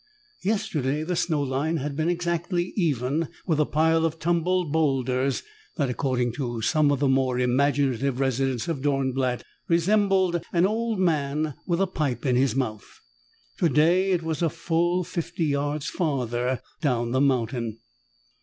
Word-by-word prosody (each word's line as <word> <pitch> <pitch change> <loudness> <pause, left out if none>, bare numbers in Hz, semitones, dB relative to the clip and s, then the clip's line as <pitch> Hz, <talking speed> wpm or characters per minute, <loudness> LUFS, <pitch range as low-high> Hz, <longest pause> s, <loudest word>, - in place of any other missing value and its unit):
Yesterday, 155 - -1
the 180 +2 -2
snow 155 -4 0
line 140 +5 -1
had 145 0 -3
been 160 +3 0
exactly 175 +1 -1
even 150 - 0 0.2
with 160 -5 +1
a 150 - +3
pile 160 +1 +2
of 165 0 0
tumbled 175 0 0
boulders 135 -4 +1 0.3
that, 140 -6 0
according 125 -1 0
to 120 -3 -3
some 155 +3 +3
of 140 - 0
the 140 - +2
more 130 -1 +2
imaginative 135 0 +1
residents 135 -2 0
of 160 -6 -2
Dornblatt, 130 -3 0 0.2
resembled 185 0 +2
an 175 0 +3
old 225 +2 0
man 155 -4 0
with 170 -1 +1
a 195 - +3
pipe 145 - -2
in 130 -2 +2
his 130 -2 +2
mouth. 110 -6 -4 0.6
Today, 170 +4 +3
it 180 -3 +1
was 160 0 -3
a 165 - +3
full 170 +2 0
fifty 170 -1 -3
yards 145 0 -1
farther 125 - -1 0.2
down 120 -6 0
the 130 +2 +2
mountain. 120 -4 0
150 Hz, 150 wpm, -25 LUFS, 130-170 Hz, 0.6 s, a